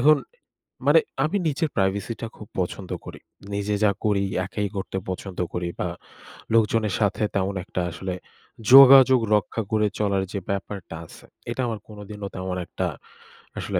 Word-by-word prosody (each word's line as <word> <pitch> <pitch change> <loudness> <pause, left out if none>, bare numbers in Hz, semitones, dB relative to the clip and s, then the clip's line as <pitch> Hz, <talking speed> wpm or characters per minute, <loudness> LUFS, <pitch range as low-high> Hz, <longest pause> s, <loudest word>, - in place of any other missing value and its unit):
এখন 150 +4 +6 0.7
মানে - - +7 0.3
আমি 180 +7 0
নিজের 155 +1 0
privacy-টা 100 +4 -1
খুব 105 - -10
পছন্দ 90 +1 -3 0.2
করি। - - -9 0.3
নিজে 100 +1 -1
যা 105 - +5
করি 100 -2 +2 0.2
একাই 100 +1 -3
করতে 95 0 -3
পছন্দ 95 0 -5
করি 90 0 -2
বা 90 - 0 0.7
লোকজনের 110 -2 +3
সাথে 105 0 +1
তেমন 100 0 0
একটা 90 - -3
আসলে 90 +1 -4 0.6
যোগাযোগ 135 -1 +10 0.2
রক্ষা 105 +2 -1
করে 105 -1 +3
চলার 100 -2 +1
যে 100 - -1
ব্যাপারটা 100 -3 -4
আছে, - - -15 0.3
এটা 130 - -2
আমার 110 -2 -3
কোনোদিনও 105 -1 -7
তেমন 95 0 -3
একটা - - -3 0.7
আসলে - - -1
105 Hz, 150 wpm, -24 LUFS, 95-115 Hz, 0.7 s, যোগাযোগ